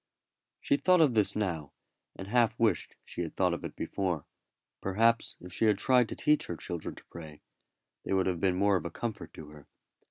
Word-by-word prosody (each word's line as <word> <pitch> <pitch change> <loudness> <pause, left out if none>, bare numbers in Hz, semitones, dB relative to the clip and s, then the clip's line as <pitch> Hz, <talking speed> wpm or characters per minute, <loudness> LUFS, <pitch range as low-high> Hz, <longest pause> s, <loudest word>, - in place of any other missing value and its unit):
She 140 - +1
thought 180 +5 +4
of 145 -6 +4
this 105 -3 +3
now, 85 -9 -2 0.4
and 95 - -8
half 115 +1 +2
wished 110 -8 +1
she - - -6
had 85 - -5
thought 90 -2 +2
of 85 - -5
it - - -6
before. 90 -6 -2 0.6
Perhaps 115 +4 +2
if 90 0 -11
she 110 - +1
had 105 -2 +4
tried 125 -1 +4
to - - -5
teach 150 0 +2
her 85 - -4
children 85 -1 -5
to - - -15
pray, 80 -3 -10 0.6
they - - -2
would 95 -1 +2
have 90 -2 -1
been 95 -2 +2
more 100 +1 +3
of - - -6
a - - -2
comfort 110 +6 -5
to 75 -2 -10
her. 75 -2 -15
95 Hz, 210 wpm, -30 LUFS, 85-115 Hz, 0.6 s, thought